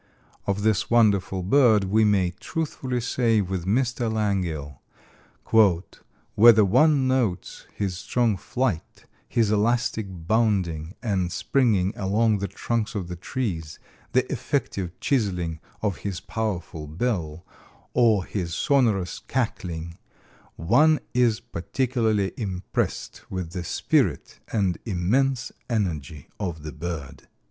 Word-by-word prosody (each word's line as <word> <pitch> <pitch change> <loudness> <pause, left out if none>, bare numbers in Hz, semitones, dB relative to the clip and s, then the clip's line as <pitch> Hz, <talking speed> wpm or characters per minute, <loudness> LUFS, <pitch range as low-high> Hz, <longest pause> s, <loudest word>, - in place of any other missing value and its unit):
Of 100 +1 0
this 110 -3 +1
wonderful 100 -5 +3
bird 110 -1 +5
we 105 +3 +3
may 95 -4 +2
truthfully 130 -6 -3
say 115 -2 +2
with 95 -2 -2
Mr. 120 +1 +1
Langille, 90 -10 -2 1.5
"Whether 110 -1 +7
one 140 +6 +4
notes 125 -9 -1
his 95 -3 -2
strong 120 0 +1
flight, 105 -1 -3 0.2
his 115 -4 +2
elastic 110 0 +1
bounding 90 -3 0
and 95 -6 0
springing 105 -8 +1
along 105 +2 +1
the 100 - -2
trunks 115 +4 -2
of 90 -4 -3
the 90 - -4
trees, 85 - -4 0.4
the - - +3
effective 90 -2 -2
chiseling 90 - 0 0.2
of 100 -5 0
his 100 -3 -4
powerful 95 -7 -4
bill, 85 -2 -2 0.5
or 110 -6 +3
his 90 -4 -3
sonorous 110 -11 +1
cackling, 85 -10 -3 0.6
one 150 - +4 0.2
is 120 -3 +3
particularly 110 +1 -1
impressed 95 -5 -3
with 90 -3 -4
the 90 -1 -4
spirit - - 0
and 100 -5 0
immense 120 +7 0 0.2
energy 80 - -2
of 85 -6 -4
the 75 - -5
bird." 80 -3 -6
100 Hz, 115 wpm, -25 LUFS, 90-115 Hz, 1.5 s, Whether